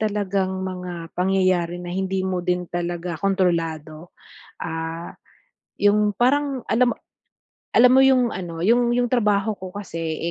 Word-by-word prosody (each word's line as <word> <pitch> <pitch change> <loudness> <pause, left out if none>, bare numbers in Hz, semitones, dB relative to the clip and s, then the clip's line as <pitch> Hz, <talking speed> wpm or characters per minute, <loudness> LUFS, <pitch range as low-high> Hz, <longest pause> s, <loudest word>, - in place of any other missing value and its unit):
talagang 200 -3 0 0.2
mga 180 -3 -6
pangyayari 185 -2 +1
na 175 0 -7
hindi 190 0 -1
mo 185 -1 -1
din 180 0 -1
talaga 175 -1 -3
kontrolado. 165 -4 -1 0.5
Ah, 165 0 -5 0.7
yung 205 +1 +3
parang 270 +4 +1
alam 245 +1 +3
mo - - -7 0.8
alam 250 +1 +6
mo 265 - +7
yung 255 -3 +3
ano, 170 -3 -6
yung 235 +6 +3
yung 245 0 +1
trabaho 210 -3 +1
ko 185 -1 -9
kasi 165 -5 -4
185 Hz, 135 wpm, -22 LUFS, 175-210 Hz, 0.8 s, mo